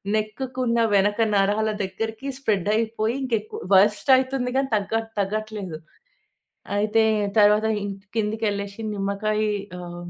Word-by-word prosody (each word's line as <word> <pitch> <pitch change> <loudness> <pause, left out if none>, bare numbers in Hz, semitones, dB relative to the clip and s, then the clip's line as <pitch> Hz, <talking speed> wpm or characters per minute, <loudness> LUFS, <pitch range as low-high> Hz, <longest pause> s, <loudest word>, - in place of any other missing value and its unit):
నెక్‌కి 250 +5 -3
ఉన్న 235 0 +1 0.2
వెనక 205 +2 +2 0.2
నరాల 205 +2 +2
దగ్గరికి 220 +6 -4
స్ప్రెడ్ 205 -8 0
అయిపోయి. 225 +1 0
ఇంకా 245 -3 0
ఎక్కువ 215 - -9 0.2
వర్స్ట్ 210 +7 +3
అవుతుంది 260 -1 -1
కానీ 270 0 0
తగ్గ 205 +1 -2 0.3
తగ్గట్లేదు. 205 -3 -3 1.0
అయితే 215 +2 +2 0.4
తర్వాత 210 +1 +5 0.5
కిందకి 220 0 -1
వెళ్ళేసి 200 +1 -5
నిమ్మకాయ 205 +2 -1 0.4
ఆహ్, 175 0 -8
215 Hz, 120 wpm, -24 LUFS, 200-225 Hz, 1.0 s, తర్వాత